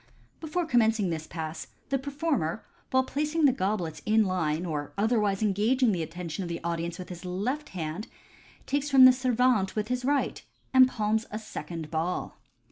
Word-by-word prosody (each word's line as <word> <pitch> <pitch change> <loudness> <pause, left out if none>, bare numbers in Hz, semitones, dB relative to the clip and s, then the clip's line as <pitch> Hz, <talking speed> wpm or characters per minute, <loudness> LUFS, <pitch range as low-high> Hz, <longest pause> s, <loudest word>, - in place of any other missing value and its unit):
— - - -35
Before 330 +2 -1
commencing 225 - +2
this 160 -1 -4
Pass, 160 -1 -5 0.2
the 275 -1 +1
performer, 280 - -2 0.2
while 260 0 +3
placing 300 +4 0
the 275 - +7
goblets 190 -8 -2
in 215 0 +3
line, 175 -3 -1
or 150 -4 -4
otherwise 210 -2 +1
engaging 220 +5 +2
the 180 -4 -1
attention 165 +1 -5
of 175 - -4
the 170 - -3
audience 170 0 -2
with 185 - -8
his 180 0 -8
left 215 +12 -3
hand, 170 +3 -5 0.6
takes 285 +1 -1
from 270 -2 +8
the 255 - +9
servante 250 -5 +2
with 215 +1 -2
his 250 0 -1
right, 280 +2 0 0.3
and 260 -1 +8
palms, 220 -2 -1
a 210 - -4
second 170 -7 -7
ball. 165 +3 -3
210 Hz, 175 wpm, -28 LUFS, 170-255 Hz, 0.6 s, the